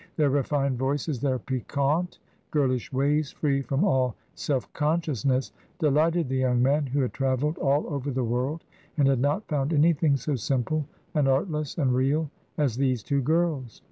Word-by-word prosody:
Their 150 -3 +2
refined 140 -2 0
voices, 135 0 -1
their 135 -2 +1
piquante, 140 +6 -1 0.3
girlish 130 -5 0
ways, 145 +2 +1
free 140 -2 0
from 135 +4 0
all 130 - +2 0.2
self 135 -4 -2
consciousness, 150 - 0 0.3
delighted 160 +1 +2
the 130 +1 -1
young 125 -2 +2
man, 140 +3 +2
who 140 +2 0
had 125 - -1
travelled 135 +3 0
all 140 +2 +2
over 140 -2 -3
the 130 -1 -1
world, 125 +7 -1 0.3
and 140 -2 +4
had 135 -2 +3
not 145 - 0
found 145 0 0
anything 155 -1 +3
so 150 +2 -2
simple, 135 +5 -1 0.3
and 145 -3 +2
artless, 150 +2 0
and 135 -6 +2
real, 140 +4 +1 0.3
as 135 -6 +1
these 130 -5 +1
two 140 -1 0
girls. 155 - 0
140 Hz, 165 wpm, -26 LUFS, 130-150 Hz, 0.3 s, and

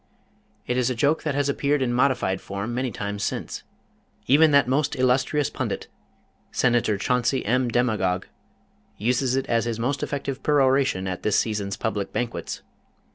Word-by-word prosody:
It 125 - -1
is 125 0 +2
a 130 - -1
joke 145 +6 +2
that 150 -3 -2
has 145 0 +1
appeared 140 +1 +1
in 125 -2 0
modified 125 -7 +1
form 100 +4 -4
many 130 +1 -1
times 100 -2 -4
since. - - -3 0.6
Even 155 +4 +6
that 140 -3 +5 0.3
illustrious 130 +3 +1
pundit, 125 -6 -4 0.6
Senator 120 -4 +2
Chauncey 125 +5 0
M. 125 +3 +1
DeMagog 110 -7 +1 0.7
uses 125 +4 +1
it 135 - 0
as 115 -1 +1
his 115 -2 -2
most 135 +5 -1
effective 140 -1 -3
peroration 135 -8 +2
at 90 -1 -4
this 105 - +1
season's 100 -3 -1
public 105 -3 -2
banquets. 120 -1 -4
125 Hz, 150 wpm, -24 LUFS, 110-135 Hz, 0.7 s, Even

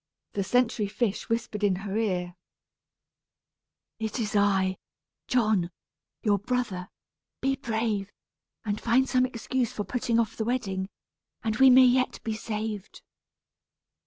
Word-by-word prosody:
The 200 - 0
sentry 235 -1 +2
fish 210 0 -2
whispered 230 -2 -2
in 200 -2 +3
her 200 0 -3
ear: 180 -5 0 1.7
"It 220 +1 -3
is 215 -2 -2
I 195 -2 +2 0.5
John 215 -8 +2 0.5
your 205 -2 +3
brother; 205 -5 -2 0.5
be 270 0 +1
brave, 220 -5 -2 0.5
and 210 0 -2
find 250 +3 +3
some 255 -1 +3
excuse 250 0 -2
for 210 - -3
putting 235 +2 0
off 225 -2 0
the 220 - 0
wedding, 195 -5 -2 0.5
and 220 -1 -1
we 265 +1 +8
may 260 +1 +8
yet 255 +1 +2
be 220 - -2
saved." 215 -2 -5
220 Hz, 130 wpm, -27 LUFS, 200-245 Hz, 1.7 s, we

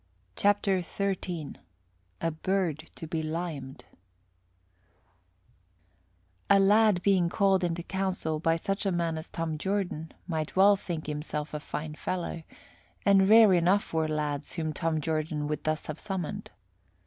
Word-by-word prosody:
CHAPTER 200 -2 +2
XIII 180 -4 -3 0.6
A 165 - 0
BIRD 165 -1 -1
TO - - -7
BE 160 0 -2
LIMED 155 -4 -5 2.6
A 200 - +7
lad 205 -1 +4
being 185 -4 +3
called 195 -1 +2
into 170 -1 -1
council 185 -5 -2
by 165 +1 +2
such 195 +5 -2
a - - +2
man 170 -2 0
as 160 - -10
Tom 160 -2 -3
Jordan 190 -4 -2
might 160 -4 -3
well 200 +2 +7
think 170 -5 -5
himself 150 0 -4
a 150 - -2
fine 150 +1 -5
fellow, 175 +1 -3 0.6
and 195 -1 +5
rare 220 -2 +8
enough 180 +3 +2
were 160 -1 +1
lads 150 -1 -2
whom 160 -3 -2
Tom 160 0 -1
Jordan 155 -1 -1
would 150 0 -3
thus 155 0 -1
have 155 0 -6
summoned. 190 -6 -4
170 Hz, 135 wpm, -29 LUFS, 155-195 Hz, 2.6 s, rare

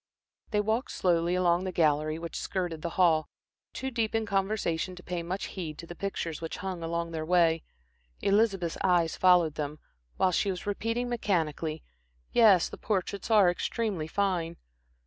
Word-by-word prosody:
They 210 -2 +1
walked 220 +5 -1
slowly 175 -1 +1
along 175 -1 +2
the 190 - -3
gallery 155 -2 +2
which 170 0 -7
skirted 175 -4 -3
the 170 - -2
hall, 165 -4 +4 0.4
too 265 0 -4
deep 225 -2 -1
in 225 0 +1
conversation 195 -3 -1
to 180 - -12
pay 175 -1 -3
much 180 +3 -4
heed 160 -5 -5
to 170 - -8
the 175 - -8
pictures 175 -4 -4
which 165 - -5
hung 185 -3 -3
along 170 0 -2
their 160 -1 -3
way. 165 -1 +3 0.6
Elizabeth's 195 -4 +1
eyes 175 -3 +3
followed 180 -4 +4
them, 150 -1 -3
the - - -22 0.4
while 185 - +3
she 200 +3 +1
was 185 -2 -4
repeating 230 +4 -1
mechanically 165 -9 -1 0.5
"Yes, 210 -7 +6
the - - -10
portraits 200 0 -2
are 210 -4 +6
extremely 190 -3 -2
fine." 175 -3 -1
180 Hz, 165 wpm, -29 LUFS, 165-200 Hz, 0.6 s, Yes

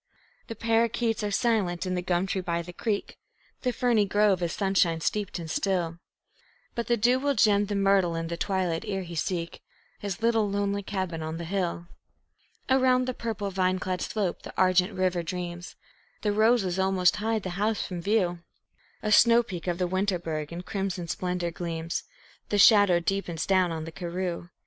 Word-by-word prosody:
The 230 - -6
parrakeets 230 0 +1
are 210 - 0
silent 200 -5 0
in 185 - -2
the 180 - -1
gum 180 0 0
tree 190 0 -2
by 170 -1 -2
the 175 +1 -10
creek; 205 +2 -3 0.4
The 250 - 0
ferny 235 -3 +2
grove 205 -2 +3
is 170 -1 -1
sunshine 190 -4 +1
steeped 205 +4 -2
and 170 -2 -6
still; 170 -1 -1 0.7
But 235 - -3
the 240 - +2
dew 245 +4 +3
will 280 +1 0
gem 205 -3 +4
the 205 - -2
myrtle 195 -3 +3
in 165 0 -2
the 170 +1 -3
twilight 185 -1 -1
ere 195 -2 -2
he 170 -1 -9
seek 170 +1 -3 0.4
His 200 -1 -4
little 225 -3 +2
lonely 200 0 -1
cabin 185 -4 -3
on 160 +1 -4
the 170 - -5
hill. 175 -1 -2 0.8
Around 255 -1 +3
the 255 - -2
purple, 215 -4 -4
vine 185 0 +1
clad 185 0 -3
slope 200 -5 -2
the - - -10
argent 185 +1 +3
river 185 -2 0
dreams; 175 +1 -5 0.5
The 210 - +2
roses 210 -4 +2
almost 190 -1 +3
hide 220 0 -1
the 185 - -4
house 215 0 +1
from 180 -2 -5
view; 180 -3 +1 0.6
A 215 - 0
snow 235 +2 +6
peak 185 -6 -7
of 175 -1 0
the 180 - 0
Winterberg 175 -5 -2
in 170 +1 -6
crimson 190 -3 -3
splendor 180 0 -2
gleams; 165 -1 -4 0.4
The 205 - +1
shadow 205 -4 +6
deepens 175 -2 -2
down 185 -2 +3
on 160 -1 -4
the 165 - -7
karroo. 175 0 -4
190 Hz, 180 wpm, -27 LUFS, 175-210 Hz, 0.8 s, snow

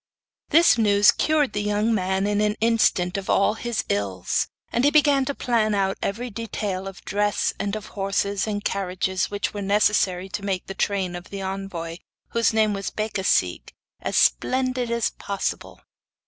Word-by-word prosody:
This 330 -6 +5
news 205 -1 +5
cured 305 -3 +1
the 205 - -1
young 210 +2 +1
man 190 -1 0
in 205 0 +1
an 210 0 +1
instant 220 -5 +2
of 195 - -6
all 200 - +3
his 235 0 -3
ills; 100 -3 -1 0.2
and 240 - +1
he 285 - +6
began 290 -2 +4
to 280 - -3
plan 220 -3 +1
out 195 -1 0
every 235 +5 -3
detail 200 -3 -4
of 195 -2 -10
dress 205 +1 0
and 200 +1 -2
of 215 0 -6
horses 200 +1 -1
and 205 -1 -3
carriages 190 -1 -1
which 205 0 -3
were 205 - -4
necessary 195 -2 +2
to 200 +1 -5
make 190 -2 -2
the 195 - -6
train 190 -2 -1
of 175 0 -9
the 200 -1 -6
envoy, 190 -4 -5 0.3
whose 230 0 +2
name 220 -1 +2
was 195 -1 -3
Becasigue, 190 - -1 0.3
as - - -1
splendid 255 - +2
as 235 -1 0
possible. 200 -1 -4
205 Hz, 170 wpm, -24 LUFS, 190-225 Hz, 0.3 s, he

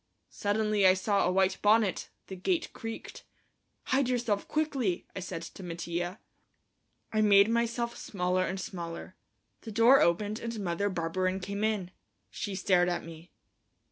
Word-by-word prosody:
Suddenly 210 -1 +2
I 185 - +6
saw 200 0 +1
a - - +2
white 190 0 +1
bonnet. 210 -2 +3 0.2
The 190 - -8
gate 330 - -1
creaked. 225 0 -7 0.6
"Hide 265 -1 +1
yourself 235 -5 0
quickly," 275 - -1
I - - -3
said 175 -2 -5
to 170 - -10
Mattia. 175 +2 -4 0.9
I 215 - +2
made 200 -1 +6
myself 235 0 0
smaller 185 -1 -1
and 190 +1 -3
smaller. 170 -3 -6 0.5
The 225 - -8
door 230 +5 +6
opened 205 +6 +1
and 230 -1 -5
Mother 195 +1 -1
Barberin 185 +1 -1
came 200 +2 -4
in. 210 -5 -1 0.4
She 200 -3 -4
stared 180 -1 +3
at 175 - -2
me. 165 +1 -11
200 Hz, 145 wpm, -30 LUFS, 180-220 Hz, 0.9 s, I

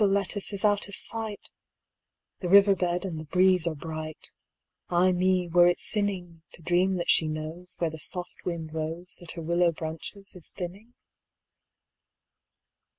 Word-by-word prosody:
Little 195 -1 +3
Lettice 200 +1 -1
is 200 0 -1
out 205 -1 +2
of 200 - -6
sight! 220 -2 -1 0.9
The 180 - -3
river 200 +1 +7
bed 180 0 -1
and 165 -4 -4
the 155 - -7
breeze 180 +1 +3
are 165 - -1
bright:Ay 160 +3 -3
me, 180 0 +2
were 175 +1 +5
it 175 - +2
sinningTo 175 -5 -3
dream 180 +3 +2
that 175 -1 +2
she 160 - +4
knowsWhere 160 +2 -4
the 160 - -8
soft 180 +3 -1
wind 165 -3 -4
roseThat 165 +3 -5
her 170 - -7
willow 170 +1 +2
branches 165 +5 -7
is 180 - -8
thinning? 195 +7 -7
175 Hz, 145 wpm, -27 LUFS, 165-190 Hz, 0.9 s, river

